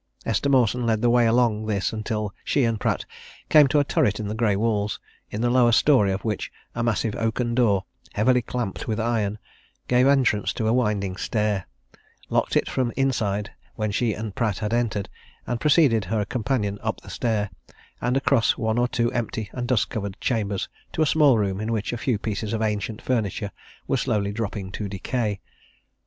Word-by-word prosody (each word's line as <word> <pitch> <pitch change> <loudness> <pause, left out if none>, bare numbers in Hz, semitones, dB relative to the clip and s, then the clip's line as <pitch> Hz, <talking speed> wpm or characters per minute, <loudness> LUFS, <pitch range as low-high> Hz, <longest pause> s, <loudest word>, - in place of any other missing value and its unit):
Esther 140 - 0
Mawson 125 -2 +3
led 110 0 +1
the 120 - +4
way 120 -1 +4
along 115 -2 +2
this 100 -1 0
until 105 -1 -3
she 140 - +1
and 115 -2 +1
Pratt - - -1 0.4
came 150 -2 +7
to 150 - +1
a - - +4
turret 110 -6 +1
in 105 - -3
the 105 - -3
grey 110 -2 +1
walls, 105 -1 0 0.3
in 105 - -4
the 120 - +2
lower 125 -1 +5
story 115 -4 +4
of 95 +3 -3
which 105 -3 -2 0.2
a 115 - -3
massive 115 -2 0
oaken 115 +1 -1
door, 105 -6 +2 0.3
heavily 125 +4 +3
clamped 120 -3 -4
with 110 0 -1
iron, 110 -3 0 0.5
gave 125 +1 +4
entrance 130 -7 +2
to 110 - -2
a 110 - +3
winding 105 -6 0
stair, 105 -4 -1 0.6
locked - - +1
it - - +1
from 125 -2 0
inside 105 -7 0 0.2
when 110 -2 -1
she 110 +1 +1
and 110 -2 -5
Pratt 105 -4 0
had 105 +1 -2
entered, 110 -4 0 0.4
and 120 -1 -3
preceded 140 - +4
her 105 +2 -1
companion 105 -3 -1
up - - -2
the - - -13
stair, 105 -4 -1 0.5
and 125 +2 +1
across 130 -3 +2
one 110 +1 0
or 120 - +3
two 120 -1 0
empty 110 -3 -3
and 120 -1 -3
dust 125 -4 +1
covered 100 -3 -4
chambers 105 -5 -1 0.3
to 160 - +2
a - - +3
small 145 -5 +5
room 100 -2 -1
in 110 +1 -2
which 110 0 -1
a - - -2
few 125 -5 +1
pieces 105 +1 -3
of 110 - -1
ancient 105 0 -2
furniture 105 -4 -1 0.4
were 135 - +1
slowly 105 -5 0
dropping 100 -3 -4
to 100 0 -4
decay. 105 +1 -2
110 Hz, 190 wpm, -24 LUFS, 105-120 Hz, 0.6 s, came